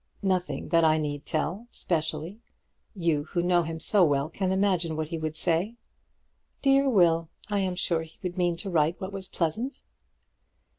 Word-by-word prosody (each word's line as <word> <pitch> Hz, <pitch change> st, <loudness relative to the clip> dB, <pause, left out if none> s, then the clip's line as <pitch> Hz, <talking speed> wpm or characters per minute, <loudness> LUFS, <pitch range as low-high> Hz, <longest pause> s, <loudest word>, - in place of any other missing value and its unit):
"Nothing 185 Hz, -2 st, -1 dB
that 165 Hz, -1 st, +4 dB
I 155 Hz, -1 st, +5 dB
need 145 Hz, -2 st, -3 dB
tell, 185 Hz, +8 st, -2 dB
specially. 160 Hz, +3 st, -2 dB, 0.6 s
You, 165 Hz, -6 st, 0 dB
who 175 Hz, +2 st, -1 dB
know 175 Hz, -1 st, +3 dB
him 165 Hz, -1 st, -4 dB
so 195 Hz, +4 st, +3 dB
well, 145 Hz, -2 st, +2 dB
can 185 Hz, +2 st, -1 dB
imagine 185 Hz, -4 st, +1 dB
what 155 Hz, -1 st, -3 dB
he 165 Hz, -, -3 dB
would 155 Hz, 0 st, -3 dB
say." 175 Hz, +7 st, +1 dB, 0.9 s
"Dear 275 Hz, 0 st, +4 dB
Will! 165 Hz, -7 st, +3 dB, 0.2 s
I 205 Hz, -, +2 dB
am 185 Hz, -2 st, -1 dB
sure 170 Hz, -2 st, +1 dB
he 160 Hz, 0 st, -12 dB
would 180 Hz, -1 st, -3 dB
mean 175 Hz, -2 st, +1 dB
to 190 Hz, +3 st, -5 dB
write 160 Hz, 0 st, +2 dB
what 190 Hz, 0 st, -5 dB
was 190 Hz, -1 st, -5 dB
pleasant." 220 Hz, -, -2 dB
170 Hz, 170 wpm, -27 LUFS, 160-190 Hz, 0.9 s, I